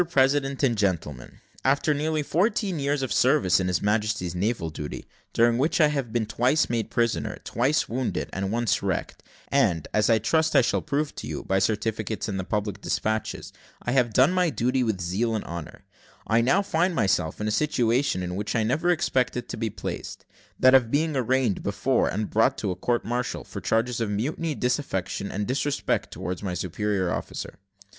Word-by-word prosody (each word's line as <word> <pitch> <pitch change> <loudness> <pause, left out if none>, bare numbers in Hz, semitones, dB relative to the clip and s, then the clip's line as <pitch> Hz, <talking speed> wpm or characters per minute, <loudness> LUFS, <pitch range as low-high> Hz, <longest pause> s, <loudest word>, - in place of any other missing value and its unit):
PRESIDENT 135 -1 +2
AND 120 -5 +2
GENTLEMEN, 75 -10 -2 0.2
After 140 +3 +2
nearly 155 +1 -1
fourteen 185 +2 0
years 140 -1 0
service 125 - +4
in 95 - 0
His 90 -1 0
Majesty's 105 -4 0
navy, 90 -6 -3 0.3
during 115 +1 +3
which 150 +5 +1
I 155 -2 +6
have 135 -6 -2
been 115 -1 0
twice 125 +8 +1
made 115 -2 -1
prisoner, 115 -1 0
twice 130 +6 +1
wounded, 125 +2 -2
and 95 +1 -2
once 120 -1 +1
wrecked; - - -3 0.3
and, 80 -3 +2
as 105 +1 +3
I 115 - +5
trust 160 +9 +1
I - - +7
shall - - +1
prove 150 -1 -1
to - - -6
you, - - -5
by 95 0 +1
certificates 110 +1 -1
and 100 -2 -3
the - - -2
public 105 0 -3
despatches, 110 0 -2 0.3
I 120 - -3
have 125 -3 +2
done 130 +9 +4
my 180 -2 +2
duty 130 -1 0
with 110 -6 0
zeal 100 +6 -1
and 110 - -3
honour 85 -2 -7 0.4
I 115 +1 +3
now 155 +12 +3
find 175 -1 +1
myself 95 - +1
in 105 - -2
a - - 0
situation 120 -6 +1
in 90 0 -4
which 105 +2 -3
I 115 - +2
never 145 +10 +1
expected 130 -8 0
to - - -4
be 115 0 -1
placed 105 - -6 0.3
that 130 0 +6
of 130 -4 +5
being 155 +3 +1
arraigned 130 -4 +1
before - - +1
and 105 +2 -2
brought 110 +1 +2
to 100 - -2
a - - -3
court 120 +4 -1
martial 120 +1 -2
for - - -8
charges 115 +1 0
of 115 - 0
mutiny, 145 +9 -2
disaffection, 125 -7 -2
and 105 +2 -2
disrespect 140 +3 -1
towards 90 -1 -5
my 95 -3 -3
superior 95 +1 -1
officer. - - -6
115 Hz, 185 wpm, -25 LUFS, 105-140 Hz, 0.4 s, I